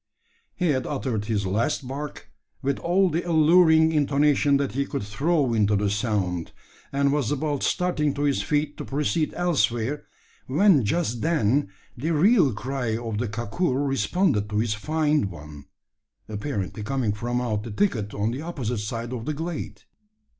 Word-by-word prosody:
He 180 -2 0
had 130 -3 0
uttered 125 -7 -2
his 105 -2 -1
last 115 +8 -1
bark, 145 +3 -7 0.3
with 140 0 0
all 185 +3 +2
the 165 +3 0
alluring 160 -1 +5
intonation 145 -1 +3
that 140 -1 -1
he 140 +2 0
could 140 -4 -4
throw 135 +5 0
into 105 -2 +2
the 100 0 +1
sound; 100 -6 -1 0.4
and 140 0 +2
was 145 -6 0
about 145 -1 -1
starting 150 -6 0
to 145 - -2
his 140 -8 +1
feet 145 +7 -1
to - - -5
proceed 150 +2 0
elsewhere, 140 -6 0 0.4
when 160 - +4
just 120 -2 -1
then 145 -7 +1 0.3
the 145 +7 -3
real 175 - +4
cry 120 0 -2
of 115 -3 -4
the 120 - -1
kakur 125 - -1
responded 135 - +1
to 105 - -2
his 110 0 +1
feigned 150 0 0
one 75 -4 -11 0.6
apparently 105 -2 -4
coming 120 -1 -1
from 120 +3 -2
out 110 -4 -1
the 115 - -7
thicket 110 - 0
on 105 +2 0
the 130 +4 -4
opposite 130 -9 -3
side 115 +3 -4
of 115 -3 -5
the 155 0 -2
glade. 165 +1 -5
135 Hz, 160 wpm, -25 LUFS, 110-150 Hz, 0.6 s, alluring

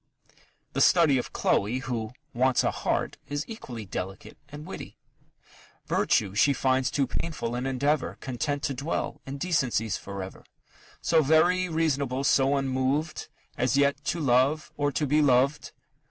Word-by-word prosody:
The - - 0
study 155 -7 +5
of - - -5
Chloe, 105 +6 +1
who 120 -4 -3 0.2
"wants 130 +1 +2
a - - +2
heart," - - -2
is 145 +1 -2
equally 125 - -7
delicate 95 +1 -6
and 150 +1 -9
witty: - - -8 0.9
Virtue 100 -3 +1
she 125 +7 +4
finds 130 0 +1
too 140 - +1
painful 130 -3 -4
an 125 +2 -2
endeavour, 140 +3 0
Content 140 +2 -3
to 140 - 0
dwell 140 +5 -3
in 135 +1 -5
decencies 130 - 0
for 100 -1 -6
ever 95 - -10 0.6
So 165 -1 +4
very 175 +5 +3
reasonable, 140 -5 0
so 140 0 +3
unmoved, 135 +3 -1 0.3
As 125 +2 +2
never - - +5
yet 145 +1 -12
to 170 - -1
love, 140 +2 +2
or 145 0 0
to 150 - 0
be 150 +2 +3
loved. 140 +1 +2
135 Hz, 155 wpm, -27 LUFS, 125-150 Hz, 0.9 s, study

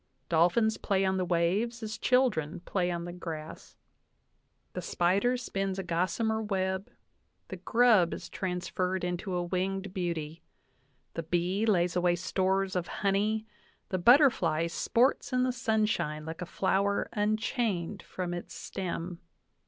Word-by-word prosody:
Dolphins 175 +7 +3
play 195 -1 +1
on 190 0 +1
the 185 - 0
waves 195 +8 0
as 215 0 -5
children 215 - +1
play 180 -1 -1
on 170 -1 -3
the 175 - -6
grass. 160 -3 -7 1.0
The - - -4
spider 200 +8 +1
spins 195 -5 -3
a 195 - -2
gossamer 185 +6 0
web; 190 -2 -1 0.6
the 185 - -5
grub 215 -2 +4
is - - -6
transferred 185 0 -2
into 180 +2 -2
a 175 - 0
winged 190 +2 -2
beauty; 165 -4 -3 0.7
the 165 - -3
bee 180 +6 0
lays 180 -4 +2
away 175 -1 +3
stores 190 +2 0
of 180 -1 -1
honey; 210 +2 0 0.4
the 185 - -1
butterfly 180 - +5
sports 235 +12 +1
in 250 0 +3
the 255 - +2
sunshine 215 -10 0
like 160 +1 -6
a 180 - -4
flower 200 +2 +1
unchained 210 -3 -1
from 180 -1 -5
its 175 - -6
stem. 180 -2 -5
190 Hz, 135 wpm, -30 LUFS, 175-215 Hz, 1.0 s, butterfly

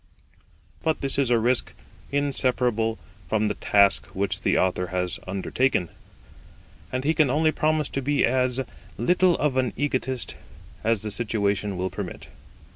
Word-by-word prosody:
But 160 -1 0
this 135 0 -1
is 135 -3 +2
a 120 - +4
risk 120 +2 +1 0.4
inseparable 125 -5 +1 0.3
from 110 -1 +1
the - - 0
task 100 -2 +3
which 95 -2 -1
the - - +2
Author 90 0 +1
has 90 0 -2
undertaken, 95 0 0 1.0
and 130 0 -2
he 155 +3 +2
can 155 -4 +3
only 155 +4 +3
promise 155 -1 +1
to 135 - -3
be 145 +2 +2
as 125 +1 +2 0.4
little 180 +8 +3
of 145 -3 0
an 125 -4 +1
egotist 130 -3 -1 0.5
as 110 -2 +1
the 105 - -3
situation 100 -3 -1
will 95 +1 -2
permit. - - -7
125 Hz, 145 wpm, -25 LUFS, 100-140 Hz, 1.0 s, a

